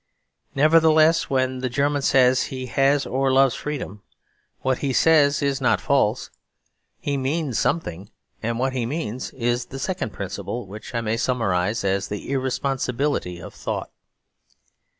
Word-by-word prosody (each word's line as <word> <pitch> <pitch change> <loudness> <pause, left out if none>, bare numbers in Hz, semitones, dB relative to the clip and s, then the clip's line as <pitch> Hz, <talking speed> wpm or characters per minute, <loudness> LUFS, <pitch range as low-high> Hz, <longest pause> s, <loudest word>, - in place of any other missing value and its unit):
Nevertheless, 160 +2 +4
when 130 -1 0
the 130 0 -2
German 145 +3 0
says 130 -1 +4
he 130 -1 -5
has 135 +2 +2
or 135 +1 0
loves 135 -1 +4
freedom, 135 -9 -5 0.6
what 130 -1 0
he 135 -2 -1
says 145 -1 +4
is 140 -1 0
not 125 - +3
false. - - +1 0.7
He 140 -1 -2
means 135 -1 -1
something; 100 - -2 0.3
and 115 +1 -2
what 130 +2 0
he 125 -3 -1
means 130 -4 -4
is 120 0 -1
the 135 - -9
second 155 - -3
principle, 120 +4 -5
which 105 +5 -9
I 115 - 0
may 115 0 -1
summarise 105 -5 0
as 100 0 0
the 105 +5 -6
Irresponsibility 130 -6 -1
of - - -10
Thought. - - -4
130 Hz, 145 wpm, -23 LUFS, 115-140 Hz, 0.7 s, Nevertheless